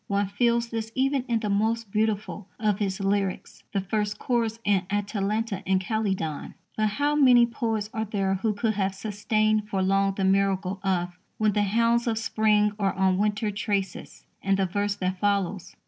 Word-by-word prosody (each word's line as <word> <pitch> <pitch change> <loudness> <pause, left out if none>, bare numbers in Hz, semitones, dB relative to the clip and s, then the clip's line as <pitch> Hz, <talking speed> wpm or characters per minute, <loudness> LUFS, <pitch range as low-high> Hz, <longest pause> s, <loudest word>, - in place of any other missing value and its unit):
One 200 -1 0
feels 235 +3 +1
this 225 -1 -4
even 270 0 +1
in 230 -2 0
that 210 - -2
most 220 +1 0
beautiful 215 -2 -1
of 210 -3 +1
his 195 -2 -1
lyrics, 195 -1 -1
the 195 - 0
first 210 +2 -2
chorus 230 -3 -1
in 200 -2 +3
Atalanta 205 +1 -1
in 190 0 +2
Calydon. 190 -6 -2 0.2
But 215 0 +1
how 290 +1 +2
many 250 -5 +6
poets 225 -3 -2
are 220 -1 -2
there 195 -2 -1
who 205 +3 0
could 220 +1 0
have 195 -1 -1
sustained 215 +1 0
for 195 -2 0
long 195 0 +2
the 195 - -2
miracle 195 0 +1
of 180 -2 -1 0.2
"When 215 -1 +2
the 210 - +2
hounds 230 +4 +2
of 225 -1 0
spring 215 -1 +2
are 195 -2 +1
on 190 0 +2
winter 210 +1 0
traces," 200 -3 -3 0.2
and 195 0 +1
the 195 - +2
verse 205 +2 -1
that 185 -1 -2
follows? 200 -2 -1
205 Hz, 180 wpm, -26 LUFS, 195-220 Hz, 0.2 s, many